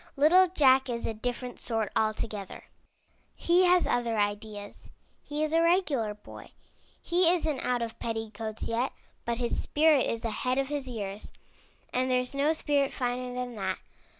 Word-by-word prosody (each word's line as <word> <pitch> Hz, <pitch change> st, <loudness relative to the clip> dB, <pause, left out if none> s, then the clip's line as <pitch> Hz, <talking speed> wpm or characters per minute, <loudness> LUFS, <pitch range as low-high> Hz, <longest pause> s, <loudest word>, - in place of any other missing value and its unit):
'' -, -, -39 dB
Little 340 Hz, +6 st, +6 dB
Jack 265 Hz, -6 st, +4 dB
is 235 Hz, -1 st, -3 dB
a 225 Hz, -, -1 dB
different 245 Hz, +2 st, -4 dB
sort 225 Hz, -3 st, -2 dB
altogether. 215 Hz, -2 st, -2 dB, 0.7 s
He 355 Hz, +2 st, +3 dB
has 360 Hz, 0 st, +4 dB
other 235 Hz, -2 st, 0 dB
ideas. 205 Hz, 0 st, -3 dB, 0.3 s
He 295 Hz, +1 st, -3 dB
is 310 Hz, 0 st, -1 dB
a 330 Hz, -, +4 dB
regular 310 Hz, -, +2 dB
boy. 210 Hz, -, -13 dB, 0.5 s
He 345 Hz, 0 st, +3 dB
isn't 315 Hz, -6 st, 0 dB
out 245 Hz, -1 st, 0 dB
of 225 Hz, -1 st, -6 dB
petticoats 225 Hz, -1 st, -4 dB
yet, 235 Hz, +3 st, -1 dB, 0.3 s
but 235 Hz, 0 st, -1 dB
his 240 Hz, -1 st, -1 dB
spirit 300 Hz, -2 st, +3 dB
is 230 Hz, 0 st, -3 dB
ahead 250 Hz, +3 st, -1 dB
of 275 Hz, 0 st, 0 dB
his 290 Hz, -2 st, -3 dB
years, 205 Hz, -4 st, -6 dB, 0.6 s
and 255 Hz, +1 st, +1 dB
there's 250 Hz, 0 st, +1 dB
no 280 Hz, +3 st, +2 dB
spirit 285 Hz, -3 st, +1 dB
finer 250 Hz, 0 st, -2 dB
than 250 Hz, -1 st, -4 dB
that. 190 Hz, -2 st, -2 dB
250 Hz, 160 wpm, -28 LUFS, 225-295 Hz, 0.7 s, Little